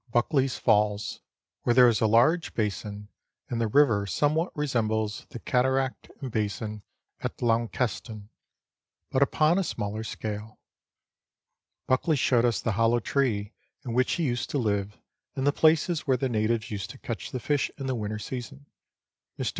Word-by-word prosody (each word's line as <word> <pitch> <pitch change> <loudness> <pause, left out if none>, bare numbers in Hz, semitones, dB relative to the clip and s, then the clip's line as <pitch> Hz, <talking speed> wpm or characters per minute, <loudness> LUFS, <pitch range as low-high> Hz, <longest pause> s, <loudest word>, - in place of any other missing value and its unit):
293 120 +5 +2
Buckley's 135 -1 +2
Falls, 105 -2 +1 0.4
where 120 - +2
there 125 -1 +8
is 115 -3 +2
a 110 - +4
large 145 +10 +3
basin, 105 -1 -3 0.4
and 115 -1 -1
the 115 - +2
river 110 -5 +3
some 145 - +1
what 165 +3 0
resembles 110 -7 -1
the - - -7
cataract 130 +2 0
and 130 -3 -5
basiu 105 0 -2 0.4
at - - -5
Launceston, 115 -2 -1 0.8
but 130 - +1
upon 155 +5 +3
a - - +1
Smaller 110 - -3
scale. 110 0 -6 1.3
Buckley 140 +5 +2
showed 125 -4 +3
us 115 -4 +1
the 115 - 0
hollow 115 +3 +3
tree 110 -5 0 0.3
in 120 - -3
which 125 +1 +2
he 170 - -1
used 125 -4 -1
to - - -1
live 105 -4 -1 0.4
and 135 -1 -1
the 145 - +5
places 160 +1 +2
where 130 -2 +3
the 135 - 0
natives 115 0 0
used 100 -3 -4
to 135 - -10
catch 115 -3 -5
the 130 - -4
fish 145 +3 0
in 135 - -5
the 130 - -1
winter 110 -2 -3
season. 130 +5 -7 0.7
Mr. - - -1
120 Hz, 165 wpm, -27 LUFS, 110-135 Hz, 1.3 s, there